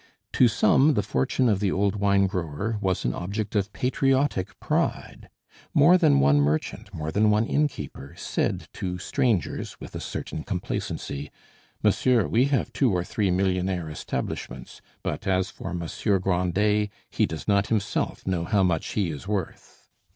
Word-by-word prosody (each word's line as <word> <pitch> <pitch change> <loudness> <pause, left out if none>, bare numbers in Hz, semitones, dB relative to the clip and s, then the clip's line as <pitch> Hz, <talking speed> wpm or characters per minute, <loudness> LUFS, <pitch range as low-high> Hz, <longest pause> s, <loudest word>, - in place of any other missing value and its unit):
To 125 - +6
some 130 +6 +4
the 105 - +1
fortune 65 - +1
of 105 -4 +2
the 100 -2 +1
old 100 +1 +1
wine 100 -1 +3
grower 95 +4 -2
was 95 -2 0
an - - +1
object 100 +4 -4
of 100 0 0
patriotic 135 -4 0
pride. - - -2 0.5
More 155 +5 +7
than 70 - +4
one 70 +1 +4
merchant, 75 +2 -1
more 80 0 -4
than 105 +4 +3
one 105 +2 +3
innkeeper, 145 - -2
said - - -2
to 90 -1 -4
strangers 105 - -1
with - - -10
a - - -4
certain 75 - -5
complacency: 75 -5 -4 0.5
"Monsieur, 125 -5 +3
we 120 +4 +3
have 140 -1 0
two 130 -5 +2
or 90 -2 0
three 100 +2 -1
millionaire 90 -2 0
establishments; - - -5 0.2
but - - -3
as 95 0 +1
for - - -7
Monsieur 90 +4 -1
Grandet, 95 +3 +1 0.2
he - - +2
does 80 - -7
not 100 -1 +3
himself 105 -3 -1
know 90 -3 0
how 100 +2 +2
much 90 -3 0
he 95 -6 0
is 75 +5 -8
worth." 100 -5 -5
95 Hz, 160 wpm, -25 LUFS, 90-110 Hz, 0.5 s, More